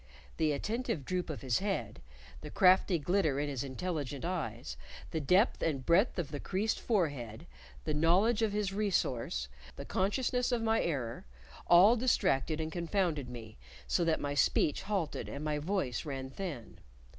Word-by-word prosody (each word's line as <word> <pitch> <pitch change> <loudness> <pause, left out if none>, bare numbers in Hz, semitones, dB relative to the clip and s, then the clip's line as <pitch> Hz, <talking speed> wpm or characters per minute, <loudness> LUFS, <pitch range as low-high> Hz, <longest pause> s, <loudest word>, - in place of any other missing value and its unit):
The 155 -1 +2
attentive 205 - -2
droop 180 -2 -2
of 155 - -5
his 125 -4 +1
head; 190 - -3 0.4
the 150 - -7
crafty 185 +1 +4
glitter 160 -3 +1
in 145 0 -1
his 135 -3 -3
intelligent 145 0 -4
eyes; 115 - -3 0.4
the 160 - -2
depth 185 - +3
and 140 -5 -1
breadth 190 +8 +3
of 170 -5 -3
the 145 - -4
creased 200 +7 -1
forehead; 145 - -1 0.4
the 155 - -2
knowledge 185 +9 +3
of 220 -2 +2
his 205 -2 -1
resource, 130 - -1 0.3
the - - -7
consciousness 245 +6 0
of 235 -2 0
my 225 0 +2
error, 120 - -3 0.4
all 185 +7 +7
distracted 180 - +1
and 160 0 -3
confounded 170 -5 -1
me 115 -3 -10 0.3
so 175 - +1
that 165 -1 +1
my 145 0 -2
speech 145 +1 +2
halted 195 -6 -2
and 140 - -6
my 150 -1 -1
voice 150 - -1
ran 135 -3 -5
thin. 150 - -6
165 Hz, 160 wpm, -32 LUFS, 140-195 Hz, 0.4 s, all